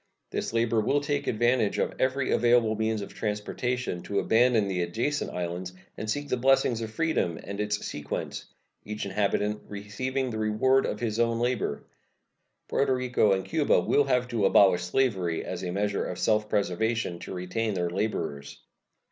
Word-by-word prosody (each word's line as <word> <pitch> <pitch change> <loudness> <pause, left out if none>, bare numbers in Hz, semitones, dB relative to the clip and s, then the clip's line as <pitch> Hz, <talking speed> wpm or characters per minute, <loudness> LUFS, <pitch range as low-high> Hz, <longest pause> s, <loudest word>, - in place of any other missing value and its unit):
This - - -2
labor 115 -1 +2
will 140 +7 +2
take 145 0 -2
advantage 120 -1 +2
of - - 0
every 130 +1 +1
available 120 -2 +4
means 110 -1 -1
of - - -9
transportation 110 0 -2
to 100 - -4
abandon 115 -1 +3
the 95 -2 -1
adjacent 115 +12 -1
islands 90 +1 -4 0.2
and 110 - -5
seek 145 +5 -2
the 125 - 0
blessings 125 -2 +3
of 110 - -4
freedom 135 - 0
and 100 0 -6
its 105 0 -2
sequence 75 -1 -5 0.4
each 105 0 -5
inhabitant 105 +1 0
receiving 125 +6 -3
the 110 - -4
reward 110 +5 +2
of - - -3
his 115 -1 -1
own 115 0 +2
labor. 120 - -1 0.8
Porto 135 -1 +1
Rico 125 -4 +2
and 95 0 -1
Cuba 155 -3 +2
will 145 - +2
have 125 -2 +1
to 115 -4 +1
abolish 95 -3 +5
slavery, 90 -4 0
as 90 - -4
a 90 - -2
measure 100 +2 -1
of 90 - -5
self 105 -1 +1
preservation, 105 -1 0
to - - -7
retain 100 +4 -2
their 90 -1 -1
laborers. 85 -8 -3
110 Hz, 165 wpm, -27 LUFS, 100-125 Hz, 0.8 s, abolish